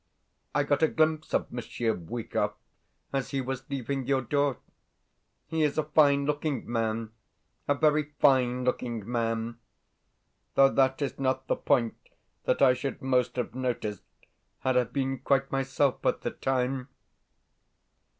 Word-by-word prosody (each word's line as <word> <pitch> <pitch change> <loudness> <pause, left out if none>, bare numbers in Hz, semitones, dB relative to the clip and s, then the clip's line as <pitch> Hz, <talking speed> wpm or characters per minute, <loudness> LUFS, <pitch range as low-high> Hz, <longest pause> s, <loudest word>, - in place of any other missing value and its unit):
I - - +3
got - - +1
a 160 - +6
glimpse 155 0 +1
of - - 0
Monsieur 120 -1 -2
Bwikov 110 +7 -3 0.6
as 135 -2 -1
he 135 - -1
was 135 +1 -4
leaving 135 -1 -3
your 135 -2 +2
door. 140 +1 +1 0.9
He 160 -1 -2
is 150 -1 +1
a 155 - +3
fine 145 -2 +4
looking 150 -1 -1
man 115 -1 -1 0.6
a 145 - +3
very 150 0 +2
fine 125 -3 +3
looking 120 -4 -2
man; 115 -1 -1 1.0
though 135 0 +7
that 135 +1 +2
is 140 - -4
not 130 0 0
the - - +1
point 115 -4 +1 0.5
that - - +2
I 130 -2 +7
should 130 +2 -4
most 125 -2 +1
have 125 -3 -2
noticed 120 -6 -2 0.6
had 130 -1 +1
I 125 -1 +4
been 135 +1 -2
quite 135 +1 +1
myself 135 0 0
at - - +1
the - - -2
time.... 130 0 -1
130 Hz, 145 wpm, -28 LUFS, 120-140 Hz, 1.0 s, though